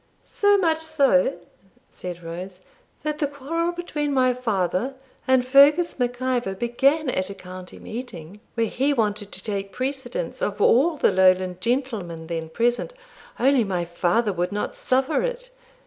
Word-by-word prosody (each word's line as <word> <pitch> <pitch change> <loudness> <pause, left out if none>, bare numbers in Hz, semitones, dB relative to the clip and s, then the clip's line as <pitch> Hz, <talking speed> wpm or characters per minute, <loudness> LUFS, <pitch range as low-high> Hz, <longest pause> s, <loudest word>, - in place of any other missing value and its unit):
'So 410 0 +3
much 325 -4 +2
so,' 280 - +2 0.6
said 175 -1 -7
Rose, 180 +3 -7 0.4
'that 300 0 -2
the 295 - +1
quarrel 310 +5 -2
between 310 -4 -3
my 255 -2 +3
father 225 +1 -1 0.3
and 260 -1 +4
Fergus 285 +5 +5
Mac 245 0 -1
Ivor 250 -6 -1
began 270 +8 +1
at 185 -3 -2
a 200 - -7
county 185 0 -10
meeting, 215 -6 -8 0.2
where 230 -1 +2
he 270 +6 0
wanted 210 -4 -1
to 190 - -7
take 200 -2 -3
precedence 270 - -4
of - - -2
all 300 +7 +4
the - - +3
Lowland 185 -1 +3
gentlemen 225 -10 -2
then 165 -1 -4
present, 240 - 0 0.5
only 265 0 +4
my 180 -4 -2
father 175 +5 +1
would 180 +1 -1
not 205 +1 -3
suffer 265 +4 +1
it. - - -4
245 Hz, 150 wpm, -24 LUFS, 185-280 Hz, 0.6 s, Fergus